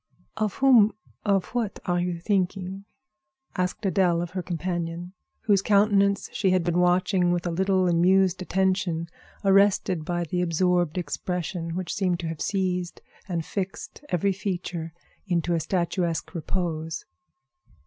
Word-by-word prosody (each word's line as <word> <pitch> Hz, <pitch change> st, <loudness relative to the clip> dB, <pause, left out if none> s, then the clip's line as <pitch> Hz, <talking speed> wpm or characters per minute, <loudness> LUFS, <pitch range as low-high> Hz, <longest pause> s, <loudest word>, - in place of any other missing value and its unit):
"Of 215 Hz, -2 st, -1 dB
whom—of 215 Hz, -6 st, +3 dB
what 235 Hz, -4 st, -2 dB
are 175 Hz, -1 st, +1 dB
you 175 Hz, -1 st, -1 dB
thinking?" 190 Hz, 0 st, -1 dB, 0.7 s
asked 180 Hz, +4 st, -2 dB
Adèle 180 Hz, -3 st, +2 dB
of 175 Hz, -, -6 dB
her 185 Hz, -, -3 dB
companion, 175 Hz, 0 st, -4 dB, 0.3 s
whose 200 Hz, -3 st, +3 dB
countenance 200 Hz, -1 st, +3 dB
she 195 Hz, -, +1 dB
had 185 Hz, -1 st, +3 dB
been 175 Hz, +1 st, +1 dB
watching 180 Hz, 0 st, +3 dB
with 175 Hz, 0 st, -1 dB
a 175 Hz, -, 0 dB
little 190 Hz, +1 st, +2 dB
amused 185 Hz, +2 st, +3 dB
attention, 185 Hz, -3 st, 0 dB, 0.4 s
arrested 195 Hz, -3 st, +3 dB
by 175 Hz, +2 st, -1 dB
the 180 Hz, +2 st, -2 dB
absorbed 175 Hz, -1 st, +1 dB
expression 175 Hz, 0 st, -3 dB
which 185 Hz, -1 st, -3 dB
seemed 180 Hz, -3 st, 0 dB
to 165 Hz, -, -3 dB
have 160 Hz, -2 st, -6 dB
seized 180 Hz, -3 st, -1 dB, 0.3 s
and 170 Hz, -4 st, -2 dB
fixed 195 Hz, +7 st, -5 dB
every 190 Hz, +2 st, +1 dB
feature 175 Hz, -4 st, -4 dB, 0.4 s
into 175 Hz, -1 st, 0 dB
a 165 Hz, -, +2 dB
statuesque 170 Hz, -1 st, -1 dB
repose. 165 Hz, -2 st, -3 dB
180 Hz, 135 wpm, -26 LUFS, 170-195 Hz, 0.7 s, whom—of